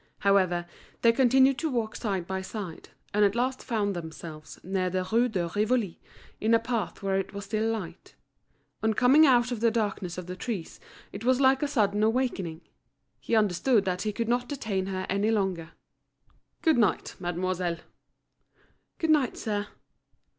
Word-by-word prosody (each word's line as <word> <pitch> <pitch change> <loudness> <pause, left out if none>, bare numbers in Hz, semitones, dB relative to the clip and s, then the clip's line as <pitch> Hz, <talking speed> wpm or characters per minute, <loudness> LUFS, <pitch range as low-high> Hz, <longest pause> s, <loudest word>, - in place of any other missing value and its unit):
However, 185 -3 +3 0.4
they 230 - +7
continued 265 +2 +4
to 320 - -1
walk 230 -5 -2
side 195 -6 -2
by 190 +1 -3
side, 190 -3 -7 0.2
and 210 +1 +3
at 200 +1 +3
last 255 +2 -1
found 205 -4 -1
themselves 160 -2 -8
near 185 0 -1
the 185 0 -2
Rue 240 +2 +3
de 180 -6 -1
Rivoli, 210 0 0 0.4
in 225 +2 +3
a - - +4
path 230 -3 -3
where 195 0 +1
it 195 - -5
was 200 0 -5
still 215 +2 0
light. 185 -6 -7 0.7
On 220 -1 +1
coming 275 +7 +6
out 245 -2 +4
of 240 - -2
the 230 +1 +4
darkness 205 -6 -2
of 180 - -5
the 180 +1 -6
trees 195 -4 -5 0.3
it 200 - -8
was 255 +1 +3
like 265 0 +4
a 295 - +1
sudden 210 -7 +1
awakening. 215 -8 0 0.6
He 230 - -1
understood 210 +2 +3
that 180 -1 -1
he 215 - -1
could 230 +2 -3
not 245 +1 0
detain 210 -9 -2
her 185 -1 -3
any 200 +3 +1
longer. 190 -6 -1 0.9
"Good 320 -7 +4
night, 215 -5 +1
mademoiselle." 175 -1 -2 1.2
"Good 325 -1 +1
night, 285 -6 +2
sir." 205 -1 -2
210 Hz, 170 wpm, -28 LUFS, 185-240 Hz, 1.2 s, they